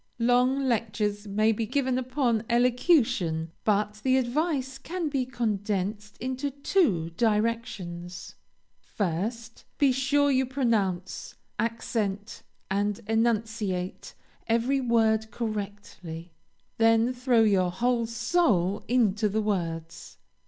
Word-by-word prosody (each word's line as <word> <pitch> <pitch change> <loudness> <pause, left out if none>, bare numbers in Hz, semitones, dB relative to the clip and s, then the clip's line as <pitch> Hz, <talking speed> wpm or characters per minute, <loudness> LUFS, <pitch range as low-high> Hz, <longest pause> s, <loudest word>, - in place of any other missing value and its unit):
Long 250 +3 +3
lectures 210 -3 -1
may 215 +2 +2
be 225 0 -2
given 260 0 0
upon 250 -3 0
elocution, 235 - +2
but 210 0 0
the 260 0 +3
advice 265 +1 -1
can 335 +2 -3
be 270 -3 -1
condensed 210 -3 -2
into 260 +3 -3
two 275 - +1
directions. 195 -5 -2 0.5
First, 220 +5 -4
be 280 -2 +4
sure 285 +2 +2
you 260 -1 +2
pronounce, 215 -9 -1 0.2
accent, 220 -3 -2 0.3
and 205 +1 0
enunciate 220 -4 -1 0.3
every 240 +4 +1
word 220 -2 +2
correctly; 205 -7 -6 0.5
then, 225 +2 +4
throw 245 -2 +3
your 190 -4 +3
whole 235 +5 0
soul 230 - +1
into 215 -3 +2
the 215 +2 0
words. 165 -5 -3
225 Hz, 105 wpm, -27 LUFS, 205-250 Hz, 0.5 s, be